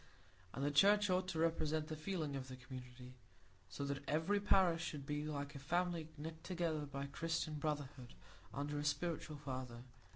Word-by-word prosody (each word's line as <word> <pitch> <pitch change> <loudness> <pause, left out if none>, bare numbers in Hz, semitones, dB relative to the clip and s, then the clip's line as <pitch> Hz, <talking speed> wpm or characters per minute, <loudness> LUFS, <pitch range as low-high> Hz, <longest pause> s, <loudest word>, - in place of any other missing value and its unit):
And 135 - 0
the 145 - +2
Church 205 +6 +6
ought 185 0 +2
to 180 -3 -2
represent 160 -1 +2
the 155 - -4
feeling 155 -3 -2
of 130 -1 -4
the 130 - -6
community, 125 0 -9 0.6
so 140 - -3
that 140 0 -2
every 160 +7 +3
parish 185 -5 +4
should 145 -4 -4
be 150 +1 -1
a 145 -1 -1
family 175 +2 0
knit 160 +2 -6
together 165 -5 0
by 140 0 -3
Christian 165 +2 -1
brotherhood 145 -4 -3 0.4
under 145 +1 -2
a - - -1
spiritual 150 +1 -1
father. 130 -4 -5
150 Hz, 165 wpm, -40 LUFS, 140-165 Hz, 0.6 s, Church